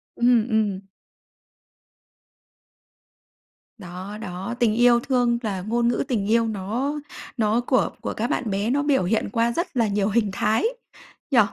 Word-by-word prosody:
Ừm, 240 -2 +3
ừm. 215 -4 +1 3.0
Đó, 185 +1 -8
đó, 185 +4 -5
tình 235 -3 +3
yêu 240 0 +5
thương 245 -2 +1
là 200 -5 -3
ngôn 235 +4 0
ngữ 240 - +1
tình 210 -6 -1
yêu 230 0 +3
nó 225 +8 -2 0.4
nó 220 +1 +2
của 255 +1 +1
của - - -3
các 235 +3 -2
bạn 235 - -1
bé 200 +3 -1
nó 285 +3 +1
biểu 285 -7 +2
hiện 215 +5 0
qua 230 +2 +1
rất 340 +9 -1
là 230 -2 +3
nhiều 200 0 0
hình 215 -1 +1
thái, 215 +3 +1 0.7
nhỉ? 250 - +5
225 Hz, 150 wpm, -23 LUFS, 205-240 Hz, 3.0 s, yêu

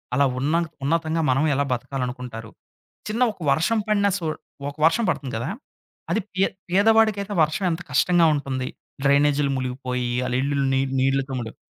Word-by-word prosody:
అలా 140 - +4
ఉన్న 145 +5 +1 0.3
ఉన్నతంగా 165 +2 0
మనం 135 +4 +2
ఎలా 140 - +1
బతకాలనుకుంటారు. 125 -3 -4 0.6
చిన్న 220 +3 -2
ఒక 200 - -25
వర్షం 165 +11 +2
పడిన 205 -1 +3
సు 175 - -5 0.5
ఒక 140 - -13
వర్షం 225 +8 +4
పడుతుంది 135 -7 -2
కదా! 125 +7 -3 0.6
అది 220 - +1
పే 190 - +3 0.3
పేదవాడికైతే 205 +1 +3
వర్షం 155 +5 0
ఎంత 165 +1 -3
కష్టంగా 175 -2 +4
ఉంటుంది. 130 -3 -3 0.4
డ్రైనేజ్‌లు 140 0 +3
ములిగిపోయి 125 -1 -3 0.2
ఆళ్ళ 125 - -2
ఇల్లులు 140 0 0
నీల్ 135 0 0
నీళ్లతో 135 0 +1
ములిగి. 110 -1 -7
140 Hz, 150 wpm, -23 LUFS, 130-175 Hz, 0.6 s, అలా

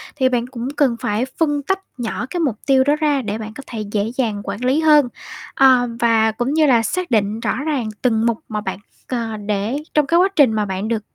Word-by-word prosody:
thì 260 -3 +2
bạn 245 -1 -1
cũng 250 -1 -6
cần 260 -5 +3
phải 235 0 -1
phân 295 -3 +1
tách 385 +6 0 0.2
nhỏ 240 0 -3
cái 355 - -3
mục 275 -9 0
tiêu 265 -1 +4
đó 290 +2 +2
ra 295 -3 +1
để 215 -1 -3
bạn 220 -1 -7
có 275 - -9
thể 220 -3 -5
dễ 215 +2 -1
dàng 220 -6 -1
quản 205 +5 -4
lý 265 +5 +2
hơn. 300 -4 +5 0.5
Ờ, 255 -2 +5
và 225 -1 +3
cũng 240 +5 -2
như 315 0 +4
là 245 -5 +4
xác 360 +7 -3
định 215 0 +1
rõ 230 0 -1
ràng 270 -8 -1
từng 230 -3 +2
mục 230 -2 +1
mà 210 -1 -3
bạn, 200 - -5 0.3
ờ, 230 -3 -3
để 210 +5 -2 0.2
trong 300 -2 +2
cái 335 +3 +3
quá 370 - +5
trình 270 -7 +5
mà 215 -1 0
bạn 195 +2 -3
được 225 -2 -2
240 Hz, 235 wpm, -19 LUFS, 220-280 Hz, 0.5 s, hơn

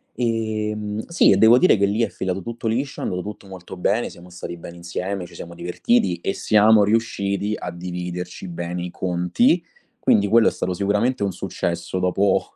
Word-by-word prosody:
ehm, 110 -2 -2
sì, 170 - +4
e 95 - +4
devo 110 +4 +7
dire 185 - +5
che 100 - +3
lì 105 +3 0
è 115 - +1
filato 95 0 -3
tutto 115 +3 -7
liscio, 130 +5 -2
è - - -4
andato 90 0 -2
tutto 105 +1 -8
molto 95 -1 -10
bene, 105 +6 0
siamo 90 +1 -14
stati 85 0 -7
bene 85 +1 -10
insieme, 90 +2 -4
ci 85 - -16
siamo 85 0 -8
divertiti 90 +1 0
e 95 - -1
siamo 110 0 +5
riusciti 100 -1 0
a 90 - -5
dividerci 90 +1 -6
bene 85 0 -4
i 90 - -4
conti. 90 - +1 0.4
Quindi 100 -1 +3
quello 115 +2 +5
è - - +4
stato 90 - -2
sicuramente 105 +7 0
un 100 -2 0
successo 85 +2 -3
dopo 95 +2 +1
100 Hz, 185 wpm, -22 LUFS, 90-110 Hz, 0.4 s, devo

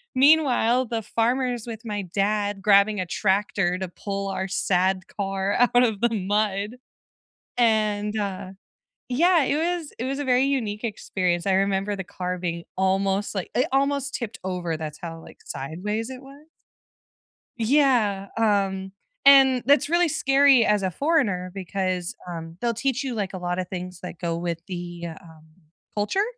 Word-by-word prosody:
Meanwhile, 260 -3 +4
the 225 0 -2
farmer's 240 +2 -1
with 225 0 -7
my 210 -2 -3
dad 205 +2 -1
grabbing 200 +1 +4
a 185 - -1
tractor 190 -1 0
to 190 0 -4
pull 195 +3 -5
our 190 0 -2
sad 185 0 +1
car 195 0 -2
out 245 0 +4
of 220 -5 0
the 235 - +3
mud. 205 +1 -1 0.8
And, 215 -2 +1
uh, 190 -2 -4 0.6
yeah, 330 +5 +4
it 280 - +1
was 335 -1 -2
it 240 - -3
was 270 +2 -2
a 290 - -2
very 255 0 +3
unique 235 -6 -1
experience. 185 -5 -1
I 195 - +3
remember 195 +1 +1
the 190 -1 -5
car 180 0 -4
being 170 -1 -4
almost 195 +2 0
like 190 - -4
it 255 - +2
almost 275 0 +1
tipped 230 -2 -4
over, 180 -3 -2
that's 155 -1 -6
how, 165 -1 -6
like, - - -14
sideways 205 - -4
it 260 0 -8
was. 280 +3 -15 1.1
Yeah, 230 -6 +2
um, 195 -3 +1 0.3
and 270 -2 +7
that's 285 +2 +4
really 345 +1 +3
scary 270 -4 +4
as 210 -1 +2
a 190 - 0
foreigner 205 - 0
because, 185 -2 -3
um, 165 -1 -7
they'll 235 -1 +1
teach 265 +3 -1
you, 265 -2 -3
like, 200 -3 -3
a 185 - -4
lotta 180 +1 -2
things 180 0 -7
that 180 -1 -7
go 170 -1 -2
with 170 -1 -3
the, 175 -1 -6
um, 160 -3 -16 0.5
culture 210 - +1
205 Hz, 160 wpm, -24 LUFS, 185-250 Hz, 1.1 s, and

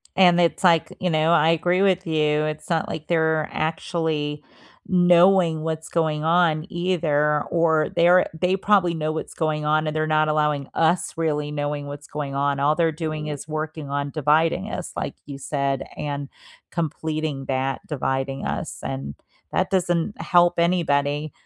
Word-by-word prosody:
And 175 -2 +5
it's 170 +3 +1
like, 170 -3 +3
you 180 - 0
know, 155 +1 +2
I 160 -1 +4
agree 175 +3 +2
with 185 -2 +2
you. 150 -1 +1
It's 155 +1 -5
not 165 -2 0
like 155 - -6
they're 160 -2 +1
actually 155 -2 -2 0.4
knowing 175 -2 +4
what's 160 0 -4
going 155 -2 0
on 165 -2 +2
either, 155 -4 +1
or 160 -2 +2
they're 175 +2 +5
they 185 +1 +2
probably 190 -4 +3
know 155 -1 -2
what's 155 - -5
going 155 -2 -1
on, 155 +1 +1
and 155 - -3
they're 155 0 0
not 155 0 +2
allowing 150 -2 0
us 165 +2 +1
really 150 -2 -1
knowing 145 0 -3
what's 145 +1 -9
going 145 -2 -5
on. 140 0 0
All 145 +2 +2
they're 165 0 +2
doing 155 -1 -4
is 145 -1 -6
working 155 -1 -5
on 140 0 -2
dividing 160 +6 +1
us, 185 - -5
like - - -4
you 140 -1 -8
said, 140 -1 -2
and 145 -1 -4 0.4
completing 155 -3 -3
that 135 0 -2
dividing 135 -1 -2
us, - - -4
and 70 +2 -5 0.4
that - - +1
doesn't 175 0 0
help 175 -1 +3
anybody. 150 -4 +1
155 Hz, 160 wpm, -23 LUFS, 150-170 Hz, 0.4 s, And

